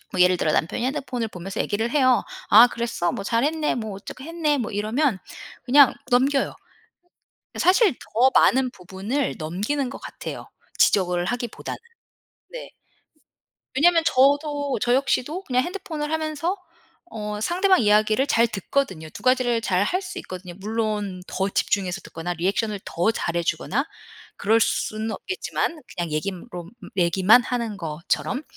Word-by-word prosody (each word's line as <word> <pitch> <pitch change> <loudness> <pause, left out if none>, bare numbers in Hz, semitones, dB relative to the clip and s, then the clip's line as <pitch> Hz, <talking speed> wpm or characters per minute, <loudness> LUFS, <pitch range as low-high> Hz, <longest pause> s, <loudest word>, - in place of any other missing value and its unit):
뭐 185 - -1
예를 180 0 +5
들어 155 - +1
남편이 175 +11 0
핸드폰을 255 -4 -3
보면서 195 +1 -6
얘기를 220 +3 -1
해요. 255 -3 +3 0.3
"아 225 +4 +9
그랬어?" 230 -8 -2
"뭐 195 - -4
잘했네." 300 +8 0
"뭐 220 -3 -4
어떻게 250 +6 -9
했네." 315 -3 0
뭐 230 -2 -3
이러면 215 +3 0 0.5
그냥 275 +2 +6 0.2
넘겨요. 270 +3 +2 1.0
사실 380 - +4
더 250 +4 +2
많은 260 0 +4
부분을 195 +8 -3
넘기는 205 - -2
것 - - -7
같아요. - - -8 0.3
지적을 180 -3 +3
하기보다는. 240 +1 -4 0.7
네. - - -8 1.1
왜냐하면 330 +4 +4
저도 285 0 +2
저 240 0 +2
역시도 280 +6 0
그냥 255 0 +1
핸드폰을 320 -4 -5
하면서 315 +4 -1 0.5
어 210 -1 -5
상대방 370 - +3
이야기를 215 +5 +3
잘 235 -4 +4
듣거든요. 195 - -2
2 - - -11
가지를 255 -2 +2
잘 185 -2 +1
할 365 - 0
수 360 - -7
있거든요. 185 -1 -8
물론 210 -3 -2
더 190 +2 -2
집중해서 195 -2 -1
듣거나 175 +2 -5
리액션을 200 +4 -1
더 175 +6 0
잘 170 -5 -3
해주거나 215 - -1 0.5
그럴 220 +3 +3
수는 220 0 -1
없겠지만 340 - -3
그냥 170 -3 -3
얘기롬 175 +1 -5 0.3
얘기만 185 +7 +5
하는 235 -4 -3
거처럼. 170 - -2
230 Hz, 315 characters per minute, -23 LUFS, 195-280 Hz, 1.1 s, 아